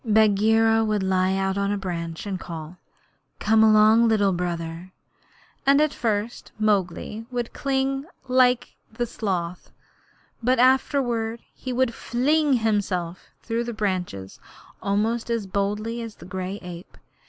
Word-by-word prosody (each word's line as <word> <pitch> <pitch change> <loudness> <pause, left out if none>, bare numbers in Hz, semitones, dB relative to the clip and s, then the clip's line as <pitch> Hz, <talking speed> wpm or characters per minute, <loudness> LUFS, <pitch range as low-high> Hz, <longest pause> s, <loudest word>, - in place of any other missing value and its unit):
Bagheera 220 0 +4
would 210 -2 0
lie 190 0 +2
out 195 0 0
on 200 0 0
a 205 - 0
branch 170 -3 -5
and 195 -2 -3
call, 165 0 -8 0.6
'Come 220 +1 +4
along, 220 +1 +6
Little 205 -3 +3
Brother,' 170 0 -4 0.7
and 280 +1 +5
at 305 -1 +2
first 220 0 -2
Mowgli 210 +1 -1
would 245 -2 -3
cling 270 0 -1 0.2
like 250 -1 +3 0.2
the 240 +2 -2
sloth, 180 -6 -3 0.7
but 250 +2 +2
afterward 245 -3 +2
he 255 - -6
would 250 -1 +1
fling 285 +6 +1
himself 200 -7 -1 0.2
through 230 0 -1
the 235 0 -5
branches 180 - -3 0.4
almost 220 +4 0
as 230 -3 -1
boldly 210 +4 -2
as 230 -2 -7
the 170 - -13
gray 185 +2 -4
ape. 180 0 -10
215 Hz, 130 wpm, -24 LUFS, 190-235 Hz, 0.7 s, along